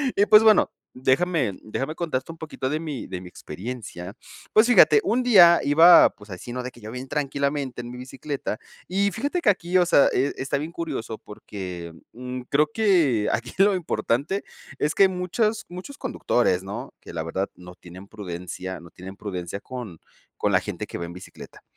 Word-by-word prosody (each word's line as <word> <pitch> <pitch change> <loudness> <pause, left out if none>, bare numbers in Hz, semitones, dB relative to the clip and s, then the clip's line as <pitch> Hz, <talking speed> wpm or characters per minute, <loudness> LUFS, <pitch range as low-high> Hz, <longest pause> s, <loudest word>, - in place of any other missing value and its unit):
Y, 200 - +4
pues, 215 0 +8
bueno, 220 -1 +5 0.2
déjame 130 - +1
déjame 135 +8 -4
contarte 160 -4 -3
un - - -17
poquito 155 -5 -4
de 155 +2 -1
mi 150 -5 -5
de 90 -1 -6
mi 90 - -10
experiencia. 100 -2 -8 0.4
Pues, 220 +2 +6
fíjate, 155 -11 +7
un 235 +5 +1
día 175 -8 +7
iba, 160 +5 +7
pues, 105 0 -17
así, 90 +5 -8
¿no? 125 - -3
De 125 - -6
que 120 - -17
yo 110 +1 -8
bien 125 +2 -7
tranquilamente 140 -2 -2
en 120 - -8
mi 125 - -8
bicicleta. 130 -2 -5 0.3
Y 200 +2 +1
fíjate 285 - -2
que - - +3
aquí, 185 -2 +1
o 180 - +4
sea, 155 -5 +5
eh, 135 +3 +1
está 135 +1 -1
bien 155 +4 -5
curioso 135 -10 -4
porque, 90 -5 -8 0.2
mm, 125 +1 -6
creo 150 +2 +3
que 165 - +3
aquí 125 +2 -3
lo 200 0 +5
importante 165 +1 -1 0.4
es 150 - +1
que 195 - +6
muchas 190 +5 -1
muchos 180 +11 -9
conductores, 120 - 0
¿no? 100 +1 -7
Que - - -12
la 80 -1 -3
verdad 95 +4 -3
no 90 0 -13
tienen 90 +3 -13
prudencia 95 -2 -6
no 85 - -13
tienen 95 +2 -10
prudencia 95 -1 -5
con 120 -10 -8 0.4
con - - 0
la - - +4
gente - - -5
que - - -6
va 85 - -4
en 85 - -9
bicicleta. 90 - -12
130 Hz, 190 wpm, -24 LUFS, -, 0.4 s, pues